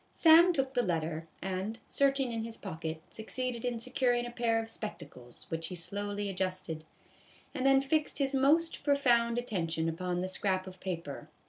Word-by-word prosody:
Sam 335 +2 +7
took 270 -5 -1
the 245 - +3
letter, 165 -4 -2 0.2
and, 190 +4 -3
searching 275 -2 +2
in 225 -1 -2
his 230 0 -6
pocket, 160 -4 -5
succeeded 240 +1 -3
in 245 -2 -1
securing 245 0 +1
a 240 - -6
pair 235 -1 +1
of 225 - -4
spectacles, 165 - -8
which 165 0 -2
he 180 - -5
slowly 205 +3 -2
adjusted, 185 -4 -3 0.7
and 265 - 0
then 270 0 +6
fixed 300 +2 0
his 275 -1 +1
most 300 +5 +3
profound 240 -5 +3
attention 170 -9 -1
upon 175 +2 -2
the 185 - -1
scrap 185 0 0
of 185 0 -10
paper. 170 -7 -5
220 Hz, 165 wpm, -31 LUFS, 180-255 Hz, 0.7 s, Sam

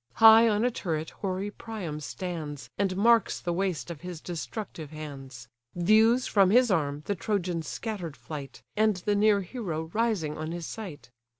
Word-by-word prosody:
High 225 +1 +8
on 210 +2 +2
a 250 - +2
turret 160 -7 -3
hoary 195 0 -3
Priam 205 -10 -6
stands, 155 -3 -6
And 190 -2 0
marks 230 +3 +4
the 175 - -2
waste 180 -3 -2
of 155 -3 -8
his 180 -2 -6
destructive 160 - -6
hands; 135 -5 -9 0.3
Views, 220 +7 +4
from 195 -3 +4
his 245 +2 +5
arm, 145 -4 0
the 205 - 0
Trojans' 180 -5 -2
scatter'd 185 -10 -5
flight, 145 -3 -8
And 215 -1 +3
the 210 - +2
near 205 0 +4
hero 170 -6 -5
rising 205 -10 0
on 155 +1 -4
his 170 -1 -5
sight! 150 - -8
180 Hz, 165 wpm, -28 LUFS, 155-215 Hz, 0.3 s, High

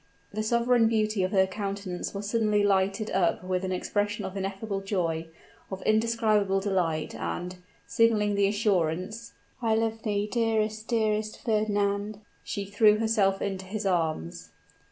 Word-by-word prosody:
The 215 - -2
sovereign 235 +1 +3
beauty 215 -2 +1
of 185 +1 0
her 190 -2 +4
countenance 195 -2 -4
was 200 0 -5
suddenly 210 -2 +2
lighted 195 +2 +1
up 180 -1 +1
with 185 0 -1
an 190 - -2
expression 205 +2 -1
of 190 0 -6
ineffable 195 +1 -3
joy, 170 -5 -1 0.4
of 190 -1 -6
indescribable 215 -3 +2
delight; 175 -6 -1
and, 180 +1 -4 0.3
signaling 215 -3 +2
the 200 -1 +3
assurance, 200 +1 -1 0.3
"I 225 -2 +2
love 225 0 -1
thee, 205 -2 0
dearest, 220 -2 0
dearest 215 -2 0
Fernand!" 205 -2 0 0.2
she 200 - -4
threw 210 +1 +4
herself 210 -3 +1
into 190 -1 -3
his 205 +2 -4
arms. 155 - -1
205 Hz, 140 wpm, -27 LUFS, 190-215 Hz, 0.4 s, her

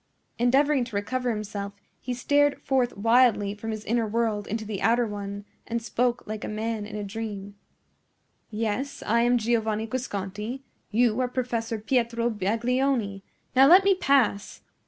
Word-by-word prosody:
Endeavoring 270 +3 +3
to 235 -3 -8
recover 250 +5 -1
himself, 210 -2 -4 0.3
he 250 - -5
stared 285 +3 +2
forth 255 -4 0
wildly 225 -2 +3
from 210 +2 -7
his 215 -1 -5
inner 230 0 +1
world 215 -2 -1
into 220 +1 -3
the 210 -2 -5
outer 235 +3 +3
one 200 -1 -6 0.2
and 235 0 -1
spoke 240 +1 -1
like 215 0 -5
a - - -3
man 215 0 -3
in 215 - -8
a 210 - -3
dream. 205 -1 -6 1.0
"Yes; 225 +5 -3
I 230 +2 +3
am 245 +1 +3
Giovanni 220 -1 0
Guasconti. 220 +1 -4 0.3
You 230 +1 +2
are 250 - +1
Professor 240 -2 -2
Pietro 235 +1 0
Baglioni. 225 +1 0 0.3
Now 265 +1 +7
let 365 +5 +8
me 395 0 +5
pass!" 275 - +1
230 Hz, 155 wpm, -26 LUFS, 210-250 Hz, 1.0 s, let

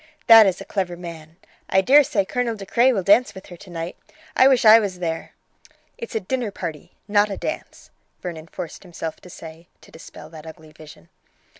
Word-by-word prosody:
That 225 -3 +8
is 185 - -1
a - - -9
clever 180 -3 -3
man. 165 -2 -10 0.3
I 190 - +3
dare 280 +8 +6
say 200 -7 -1
Colonel 240 +2 -2
De 200 -2 -9
Craye 240 +6 +3
will 200 -6 -1
dance 205 +3 +3
with 190 - -11
her 175 - -10
tonight. 175 -2 -8 0.4
I 260 - +6
wish 265 -2 +3
I 220 +1 +9
was 200 -4 -4
there." 165 -2 -5 0.6
"It's 235 - -9
a - - +1
dinner 240 +3 -3
party, 160 -6 -8
not 205 0 +2
a 195 - -5
dance," - - -7 0.3
Vernon 165 -3 -8
forced 165 - -8
himself 165 -3 -8
to 180 - -14
say, 165 0 -12
to - - -19
dispel 160 -1 -13
that 160 -1 -12
ugly 160 -1 -13
vision. 150 - -16
185 Hz, 195 wpm, -22 LUFS, 165-220 Hz, 0.6 s, I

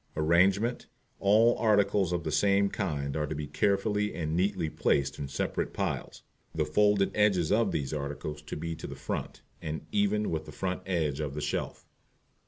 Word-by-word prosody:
Arrangement 95 +9 +2 0.3
All 110 +4 +5
articles 100 -4 +3
of 85 -2 -1
the 80 - -2
same 100 +4 +3
kind 70 -9 -3
are 75 -1 -1
to 75 - -4
be 75 0 -4
carefully 100 +7 0
and 80 -2 -2
neatly 90 -2 +1
placed 70 -2 0
in 70 - -3
separate 70 - -2
piles. - - -3 0.3
The - - +1
folded 105 -1 +3
edges 100 -6 +2
of 115 +2 +3
these 70 -2 -2
articles 75 +1 -4
to 75 - -6
be 85 +2 -4
to - - -7
the - - -7
front, - - -5 0.2
and 80 0 -5
even 105 +1 +1
with 80 -1 -2
the - - -8
front 90 -1 -3
edge 80 -6 0
of 75 -2 -3
the - - -3
shelf. - - -3
90 Hz, 180 wpm, -29 LUFS, 75-100 Hz, 0.3 s, All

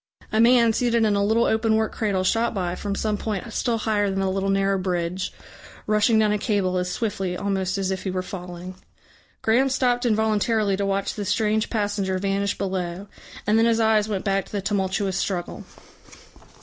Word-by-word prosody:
A 220 - +1
man 235 -1 +5
seated 235 -1 +2
in 210 -1 +2
a 200 - +2
little 220 +3 +3
openwork 220 0 +1
cradle 200 -4 -1
shot 230 +4 +1
by 180 -3 -1
from 200 +2 -3
some 210 0 -1
point 215 +2 -4
still 235 -2 0
higher 210 -2 0
than 195 0 -2
the 190 -1 0
little 195 +1 -1
narrow 195 0 +1
bridge, 180 0 -2 0.5
rushing 215 +2 +3
down 215 -1 +3
a 210 - 0
cable 195 -4 0
as 180 0 -2
swiftly 195 -5 -2
almost 190 -1 -1
as 195 -1 -1
if 190 - -3
he 195 - -3
were 185 0 -2
falling. 180 -1 -7 0.7
Graham 250 +5 +3
stopped 250 -2 +1
involuntarily 215 -1 +1
to 200 +1 -1
watch 195 0 -1
this 205 -2 -4
strange 215 0 +1
passenger 205 -3 -1
vanish 200 +1 -1
below, 190 0 -3 0.4
and 215 +2 +3
then 225 - +4
his 230 -1 +2
eyes 220 -1 +3
went 200 -2 -3
back 195 -1 +1
to - - -17
the 205 - -2
tumultuous 195 -1 -1
struggle. 180 -3 -3
205 Hz, 190 wpm, -24 LUFS, 190-220 Hz, 0.7 s, man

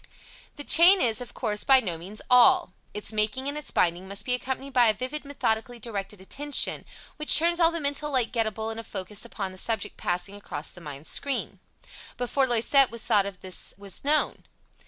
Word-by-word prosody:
The 290 - -6
chain 350 +6 +6
is, 230 -6 0
of 245 - -9
course, 210 0 -2
by 270 -1 +6
no 185 -9 -3
means 185 +6 -9
all. 250 -7 +5 0.2
Its 210 +1 -3
making 215 +5 -1
and 285 - -3
its 300 -1 -3
binding 175 +2 0
must 200 +1 -3
be 250 - +1
accompanied 265 +2 -4
by 245 -2 +5
a 215 - +2
vivid, 260 +6 -5
methodically 245 -4 -2
directed 210 -3 -6
attention, 290 +9 0 0.3
which 305 -1 +8
turns 340 +2 +2
all 330 -1 +5
the 335 0 -4
mental 290 0 -1
light 255 -5 0
gettable 220 -1 -2
in 225 - -7
a - - -7
focus 200 0 -6
upon 195 -2 -5
the 185 - -10
subject 215 -2 -3
passing 175 +3 -2
across 180 -7 -8
the 175 - -14
mind's 150 -1 -6
screen. 280 -2 -1 0.6
Before 260 +2 0
Loisette 245 +3 +4
was 230 -1 -4
thought 205 -4 +2
of 195 -2 -9
this 185 -1 -7
was 195 -2 -10
known. 300 +2 0
225 Hz, 200 wpm, -26 LUFS, 200-275 Hz, 0.6 s, which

